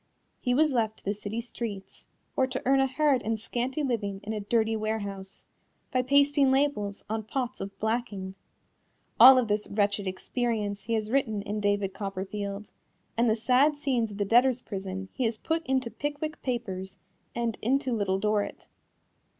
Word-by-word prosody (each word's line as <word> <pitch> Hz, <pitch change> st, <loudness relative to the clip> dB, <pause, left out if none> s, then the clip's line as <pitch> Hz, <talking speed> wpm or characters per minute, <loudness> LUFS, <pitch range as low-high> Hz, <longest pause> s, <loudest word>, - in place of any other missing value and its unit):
He 245 Hz, 0 st, +1 dB
was 305 Hz, 0 st, +3 dB
left 220 Hz, -3 st, 0 dB
to -, -, -22 dB
the 200 Hz, -, +1 dB
city 210 Hz, +2 st, -5 dB
streets, 225 Hz, -5 st, -7 dB, 0.3 s
or 260 Hz, -, +3 dB
to 260 Hz, 0 st, -3 dB
earn 270 Hz, +1 st, +4 dB
a 270 Hz, -, +4 dB
hard 270 Hz, -1 st, +2 dB
and 220 Hz, +1 st, -2 dB
scanty 250 Hz, +6 st, -2 dB
living 205 Hz, -7 st, -1 dB
in 215 Hz, +2 st, -4 dB
a 215 Hz, -, -2 dB
dirty 220 Hz, +2 st, +1 dB
warehouse, 200 Hz, -3 st, -4 dB, 0.5 s
by 255 Hz, -, +2 dB
pasting 280 Hz, +1 st, +4 dB
labels 265 Hz, -7 st, 0 dB
on 220 Hz, +1 st, -2 dB
pots 255 Hz, +3 st, -3 dB
of 195 Hz, 0 st, -6 dB
blacking. 220 Hz, -4 st, -2 dB, 0.9 s
All 260 Hz, 0 st, +11 dB
of 250 Hz, -3 st, +2 dB
this 210 Hz, 0 st, 0 dB
wretched 200 Hz, -1 st, 0 dB
experience 205 Hz, 0 st, -2 dB
he 230 Hz, -, -1 dB
has 215 Hz, -1 st, -1 dB
written 220 Hz, -7 st, +1 dB
in 210 Hz, +1 st, -3 dB
David 205 Hz, -1 st, 0 dB
Copperfield, 200 Hz, +1 st, -5 dB, 0.4 s
and 235 Hz, 0 st, +3 dB
the 220 Hz, -, +3 dB
sad 255 Hz, +6 st, +3 dB
scenes 255 Hz, -6 st, 0 dB
of 205 Hz, -, -9 dB
the 205 Hz, -, 0 dB
debtors' 245 Hz, +3 st, +4 dB
prison 190 Hz, -1 st, -5 dB
he 260 Hz, -, -1 dB
has 225 Hz, -1 st, 0 dB
put 325 Hz, +6 st, -1 dB
into 260 Hz, -3 st, 0 dB
Pickwick 295 Hz, +2 st, -4 dB
Papers 195 Hz, -6 st, -4 dB, 0.4 s
and 235 Hz, -2 st, -2 dB
into 260 Hz, +2 st, +1 dB
Little 200 Hz, -4 st, +1 dB
Dorrit. 210 Hz, +1 st, -1 dB
225 Hz, 170 wpm, -28 LUFS, 205-255 Hz, 0.9 s, All